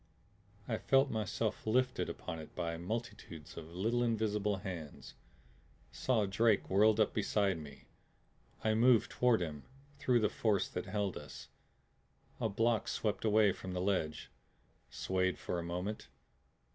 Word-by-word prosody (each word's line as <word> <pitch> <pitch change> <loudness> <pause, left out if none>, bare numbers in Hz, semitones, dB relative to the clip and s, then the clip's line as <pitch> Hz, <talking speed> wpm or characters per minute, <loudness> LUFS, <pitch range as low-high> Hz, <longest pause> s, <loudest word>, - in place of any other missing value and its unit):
I 110 -3 -1
felt 135 0 +3
myself 110 0 -2
lifted 125 +3 +1
upon 80 - -6
it 80 - -11
by 85 -2 -2
multitudes 85 -4 -6
of 80 0 -9
little 115 +6 +1
invisible 105 -3 +1
hands; 90 -6 -7 0.8
saw 115 -5 +1
Drake 105 +2 +2
whirling 105 +3 +5
up 110 - +3
beside 100 -5 +1
me. 70 -3 -11 0.8
I 110 - +3
moved 115 +1 +4
toward 125 -5 +3
him 75 -3 -5 0.4
through 125 -4 +3
the 105 - +4
force 105 -4 +1
that 90 - -5
held 100 -2 -1
us. - - -10 0.9
A 110 - 0
block 115 +2 +1
swept 105 -2 -1
away 105 -1 +5
from 95 0 -6
the 90 - -2
ledge, 90 -5 -1 0.6
swayed 95 0 0
for 90 - -3
a - - -4
moment. 90 +5 -4
105 Hz, 140 wpm, -34 LUFS, 90-110 Hz, 0.9 s, whirling